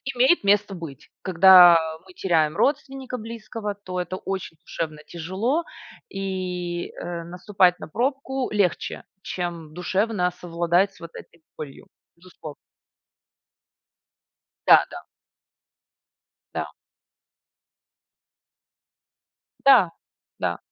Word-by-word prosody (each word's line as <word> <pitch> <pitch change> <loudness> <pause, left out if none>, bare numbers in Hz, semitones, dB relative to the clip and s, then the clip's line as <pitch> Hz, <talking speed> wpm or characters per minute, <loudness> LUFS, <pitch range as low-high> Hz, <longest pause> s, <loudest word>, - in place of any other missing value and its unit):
имеет 260 +6 +4
место 200 0 +2
быть. 155 -6 -10
Когда 180 -1 +8 0.3
мы 185 - -16
теряем 160 -5 +1
родственника 270 -3 -1
близкого, 220 -2 -6
то 185 -3 -6
это 180 +1 -5
очень 190 -4 -5
душевно 155 -2 -5
тяжело 190 - -2 0.5
и, 180 -3 -4
э, 170 -1 -6
наступать 180 +1 +1
на - - -8
пробку 265 - -2
легче, 205 -4 -1 0.2
чем 170 -4 -5
душевно 185 +2 0
совладать 175 +3 +1
с - - -20
вот 170 0 -10
этой 170 -1 -13
болью, 145 -3 -9 0.3
безусловно. 170 -4 -11 2.1
Да-да. - - +5 1.5
Да. - - -4 2.9
Да, 255 - +6 0.5
да. - - -1
185 Hz, 90 wpm, -24 LUFS, 170-210 Hz, 2.9 s, Когда